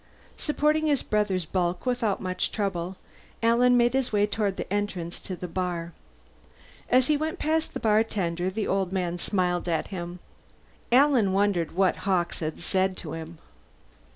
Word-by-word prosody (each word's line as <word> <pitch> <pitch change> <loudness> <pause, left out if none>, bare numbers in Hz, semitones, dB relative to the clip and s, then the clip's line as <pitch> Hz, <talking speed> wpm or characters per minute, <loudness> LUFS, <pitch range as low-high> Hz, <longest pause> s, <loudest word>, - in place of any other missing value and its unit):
Supporting 305 +1 +1
his 290 -3 +2
brother's 200 -5 0
bulk 175 +3 -1
without 245 -5 0
much 185 -1 -2
trouble, 190 -3 -2 0.5
Alan 245 +2 +5
made 240 0 +3
his 265 -1 0
way 205 -1 +3
toward 205 -2 -1
the - - -4
entrance 190 -5 -2
to 185 - -6
the 180 - -6
bar. 175 -1 -3 1.0
As 255 +1 +5
he 300 - +3
went 310 +2 -2
past 315 +1 0
the - - -2
bartender, 195 -5 +1
the 210 +3 -2
old 190 -1 0
man 175 -2 -1
smiled 180 -2 0
at 165 - -1
him. 175 -2 -5 0.7
Alan 250 -6 +5
wondered 195 -4 +1
what 190 +1 +2
Hawkes 180 -3 0
had 155 -1 -4
said 190 -1 0
to 155 - -6
him. 165 +1 -7
195 Hz, 155 wpm, -27 LUFS, 175-230 Hz, 1.0 s, Alan